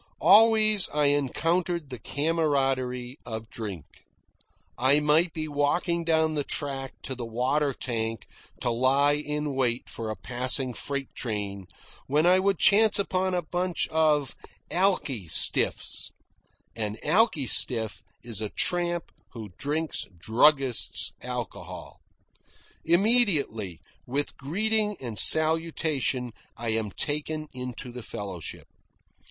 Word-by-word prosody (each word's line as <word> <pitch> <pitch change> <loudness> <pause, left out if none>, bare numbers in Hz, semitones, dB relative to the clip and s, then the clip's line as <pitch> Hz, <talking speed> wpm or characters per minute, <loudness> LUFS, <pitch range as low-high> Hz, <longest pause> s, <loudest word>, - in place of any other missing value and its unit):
Always 215 -1 +5
I 145 -1 +2
encountered 165 +3 -1
the 125 - -7
camaraderie 135 -4 -1
of 110 -1 -7
drink. 100 -10 -7 0.9
I 135 +4 +3
might 155 +4 +2
be 155 0 -4
walking 160 +4 -1
down 160 -1 +1
the 145 -2 -1
track 135 -2 -4
to 130 - -4
the 125 -1 -7
water 130 +6 -1
tank 115 -4 -4 0.4
to 120 - -1
lie 135 +4 +2
in 150 0 -3
wait 125 -2 -1
for 115 -1 -6
a 110 - -4
passing 125 +2 -1
freight 140 +3 -5
train, 100 -5 -5 0.4
when 150 +4 +1
I 180 +1 +5
would 195 -1 +1
chance 215 +4 +5
upon 185 -2 -1
a 175 - -2
bunch 175 +2 -2
of 155 -3 +1 0.4
"alki 170 - 0
stiffs." 80 - +4 0.7
An 105 -1 -4
alki 205 - +2
stiff 115 -3 +3 0.2
is 115 -3 -5
a 105 - -2
tramp 175 - -1 0.2
who 110 -3 -8
drinks 155 +3 -3
druggist's 130 - +2
alcohol. - - -8 0.8
Immediately, 170 - +1 0.3
with 140 +4 -3
greeting 210 +7 -1
and 115 -5 -4
salutation, 155 - +4 0.3
I 115 0 -4
am 110 -1 -1
taken 150 +6 -3
into 125 0 -7
the 125 +1 -8
fellowship. 95 -6 -7
145 Hz, 120 wpm, -26 LUFS, 120-165 Hz, 0.9 s, Always